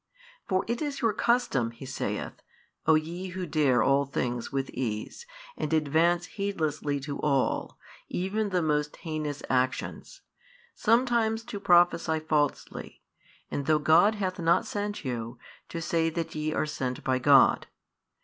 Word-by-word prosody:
For 185 -3 +1
it 235 +4 -2
is 290 -2 -3
your 225 -3 +2
custom 235 - +1
(He 115 +3 -11
saith) 130 - -4 0.5
O 160 - +6
ye 170 +4 -2
who 185 0 -5
dare 145 -7 +2
all 140 +1 +3
things 125 -3 -3
with 135 -1 -2
ease, 120 - -4 0.3
and 150 - -3
advance 160 +3 +2
heedlessly 155 -8 -2
to 140 +1 -5
all, 140 -3 0 0.3
even 205 +4 -1
the 180 -3 0
most 150 -1 0
heinous 155 -3 -4
actions, 130 0 -2 0.5
sometimes 230 -1 +2
to 225 -3 -6
prophesy 175 -3 +4
falsely, 155 -2 -2 0.5
and 140 -1 -3
though 155 -1 +4
God 165 +8 +4
hath 190 -2 -3
not 170 +1 +3
sent 205 -4 -4
you, 120 -1 -4 0.3
to 170 - -4
say 165 0 +1
that 165 0 -4
ye 155 0 -2
are - - 0
sent 130 -4 -4
by 130 -1 +1
God. 140 +1 +5
160 Hz, 145 wpm, -28 LUFS, 140-185 Hz, 0.5 s, O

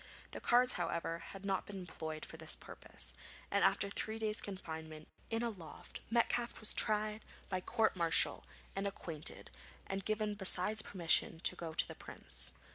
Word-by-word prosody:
The - - -5
cards, 250 +1 +5
however, 170 -1 -1
had 195 +3 -9
not 195 -1 0
been 205 - -6
employed 160 -4 -5
for - - -8
this 160 0 +4
purpose, - - -6 0.4
and - - +3
after 200 - +4
three 220 +2 -1
days' 215 -1 -1
confinement 160 -5 -6 0.2
in 225 +1 0
a 235 - 0
loft 165 -7 -9
Metcalfe 235 +1 +1
was 215 - -3
tried 215 0 +2 0.3
by 185 -2 -1
court 220 +3 +2
martial 170 -2 +3 0.3
and 195 +1 0
acquitted, 165 -6 -3 0.3
and 195 0 -3
given 215 0 0
besides 205 +1 +4
permission 170 -4 +2
to - - +3
go 165 -2 -5
to - - +5
the - - -6
Prince. - - -2
195 Hz, 165 wpm, -36 LUFS, 165-215 Hz, 0.4 s, cards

